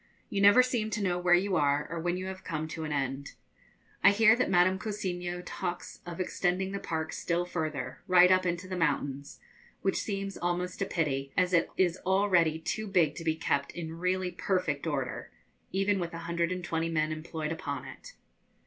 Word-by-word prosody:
You 195 - 0
never 205 +5 +8
seem 240 -4 -1
to 210 -1 -2
know 180 -2 +1
where 180 0 +5
you 190 +1 +1
are, 145 0 +2
or 165 +1 -4
when 175 +2 -1
you 185 - -4
have 190 0 -6
come 155 -2 -3
to 160 0 -5
an 150 - -4
end. 140 -1 -2 0.7
I - - +9
hear 220 +2 +6
that 250 - 0
Madame 185 +1 +4
Cousiño 180 -4 -4
talks 175 -1 -5
of 170 0 -6
extending 185 +1 0
the 200 - -3
park 160 -3 -3
still 175 0 -1
further, 155 -7 -4
right 180 -1 +7
up 185 0 +4
into 175 0 -2
the 185 - -4
mountains, 140 -4 -1 0.4
which 195 - +1
seems 195 -1 -4
almost 175 +1 -2
a 195 - +1
pity, 140 -5 -1
as 185 0 +2
it 170 - +3
is 180 -1 +2
already 185 -4 +3
too 215 +7 -3
big 175 -7 +3
to - - -6
be 160 -1 +1
kept 140 -3 -1
in 165 -1 -6
really 180 0 0
perfect 170 -7 -1
order, 140 -5 -3 0.4
even 195 +1 +1
with 170 -1 -4
a 170 0 -7
hundred 170 0 0
and 180 -1 -3
twenty 165 -1 -1
men 155 -1 0
employed 155 0 -4
upon 145 -3 -4
it. - - -11
175 Hz, 195 wpm, -30 LUFS, 160-190 Hz, 0.7 s, I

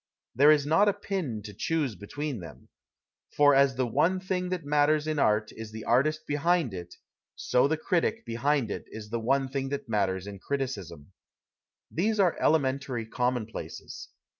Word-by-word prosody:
There 140 +5 +6
is 150 -2 +5
not 165 +8 +4
a - - +1
pin 175 - -3
to 105 -1 -8
choose 145 - -1
between 130 +7 -5
them. 85 -2 -12 0.7
For 145 -1 +6
as 135 -1 +4
the 130 0 +1
one 150 +10 +2
thing 185 -1 -2
that 180 -4 -3
matters 150 +1 +2
in 155 -1 -1
art 105 -3 +2
is 110 -1 -8
the 110 0 -7
artist 155 +6 +1
behind 150 - +1
it, 90 -1 -8 0.4
so 125 +2 +2
the 160 +2 0
critic 180 +7 0
behind 120 0 0
it - - -5
is 105 -1 -9
the 115 - -1
one 135 +4 +1
thing 135 0 -3
that 140 -2 -4
matters 95 -4 0
in 100 -1 -8
criticism. 100 - -4 0.8
These 210 +6 0
are 185 -4 +4
elementary 135 -5 +1
commonplaces. 125 -1 -4
135 Hz, 165 wpm, -28 LUFS, 110-155 Hz, 0.8 s, There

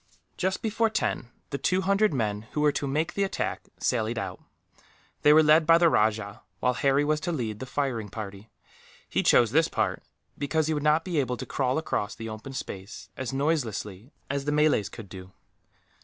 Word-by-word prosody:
Just 190 +1 -1
before 225 +1 +1
ten, 215 - -1 0.2
the 140 - -2
two 185 +1 +1
hundred 200 +2 +3
men 110 -5 -2
who 150 - 0
were 150 0 +4
to 140 - -2
make 155 +5 -1
the 200 - 0
attack 195 - -3
sallied 115 -1 0
out. 95 -4 -4 0.8
They 150 - +6
were 155 +1 +7
led 155 +1 +5
by 165 0 +7
the 170 -1 +5
rajah, 105 -4 +1 0.2
while 125 +3 +2
Harry 135 +2 +2
was 150 0 +1
to 165 +3 -2
lead 115 -9 -3
the 130 - -6
firing 125 -6 -2
party. 105 0 -8 0.6
He - - 0
chose 120 -3 +4
this 160 +4 +4
part, - - -1 0.4
because 155 +2 +1
he 160 - 0
would 150 - -1
not 150 +2 +3
be 175 -5 0
able 125 -2 -1
to - - -6
crawl 130 0 0
across 130 -9 -2
the 115 0 -6
open 110 +5 -8
space 95 -5 -7
as 130 -3 -4
noiselessly 125 - -2 0.2
as 140 0 -2
the 150 - 0
Malays 150 -8 +3
could 110 -4 -10
do. 95 0 -11
135 Hz, 195 wpm, -27 LUFS, 110-155 Hz, 0.8 s, were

